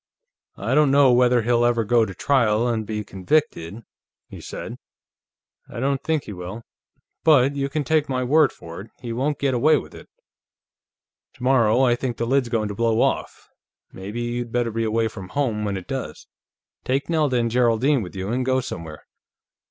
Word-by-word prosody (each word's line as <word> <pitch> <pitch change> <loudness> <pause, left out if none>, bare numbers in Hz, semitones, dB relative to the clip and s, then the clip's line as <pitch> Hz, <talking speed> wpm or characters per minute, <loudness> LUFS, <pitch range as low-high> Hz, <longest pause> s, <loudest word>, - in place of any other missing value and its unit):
"I - - -2
don't 150 -1 +4
know 140 -1 +5
whether 125 -1 +4
he'll 120 +1 +2
ever 120 -1 +2
go 115 +1 +3
to 95 - -8
trial 120 -3 +2
and 110 -3 -2
be 105 -1 -3
convicted," 100 - -1 0.4
he - - -11
said. - - -7 0.9
"I - - -7
don't 135 +1 0
think 160 -3 0
he 105 - -8
will. 95 +5 -7 0.6
But 140 -3 +4
you 140 0 -2
can 150 +1 -2
take 155 +1 +1
my 130 -1 -1
word 145 +2 +4
for 85 +1 -10
it; 105 - -13
he 120 -2 -5
won't 140 +5 -1
get 140 -2 0
away 150 +5 +4
with - - -8
it. - - -13 1.3
Tomorrow, 125 -1 +3
I 125 -2 +4
think 120 -1 -4
the 115 - -1
lid's 130 0 +1
going 110 -3 -1
to - - -4
blow 115 +1 +1
off. - - -1 0.5
Maybe 100 +5 -6
you'd 120 0 -3
better 120 -1 0
be 115 +1 -1
away 110 +1 +1
from 95 -4 -9
home 115 -4 -1
when 100 -1 -2
it 95 - -8
does. - - -5 0.6
Take 135 +3 -1
Nelda 155 -6 +1
and 115 -1 0
Geraldine 125 +3 +2
with 90 -2 -8
you, 95 +1 -4
and 125 +3 0
go 130 0 +1
somewhere. 85 - -7
120 Hz, 185 wpm, -23 LUFS, 110-135 Hz, 1.3 s, know